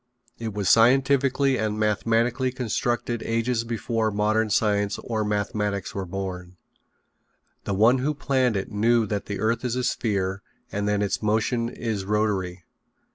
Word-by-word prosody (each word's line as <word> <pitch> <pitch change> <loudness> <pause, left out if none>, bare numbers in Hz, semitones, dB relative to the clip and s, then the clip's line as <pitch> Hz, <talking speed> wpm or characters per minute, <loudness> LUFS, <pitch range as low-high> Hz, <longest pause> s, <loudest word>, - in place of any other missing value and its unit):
It 110 -3 -5
was 100 -2 -1
scientifically 135 +3 +4
and 110 -1 -1
mathematically 115 +4 +1
constructed 120 -1 -2
ages 115 +1 0
before 115 -1 -1
modern 110 +1 +1
science 105 -1 +1
or 110 -2 -2
mathematics 105 -1 -2
were 95 -2 -4
born. 90 -1 -6 1.1
The 100 - -1
one 115 +6 +4
who 150 +4 -1
planned 130 -4 +1
it 95 - -4
knew 115 +2 +3
that 105 -2 -3
the 100 - -4
earth 115 +3 0
is 125 -1 -1
a 125 - -1
sphere 100 -5 -1 0.3
and 105 0 -1
that 105 0 +1
its 100 - -1
motion 110 +2 0
is 110 -5 -3
rotary. 95 -3 -1
110 Hz, 145 wpm, -25 LUFS, 100-120 Hz, 1.1 s, scientifically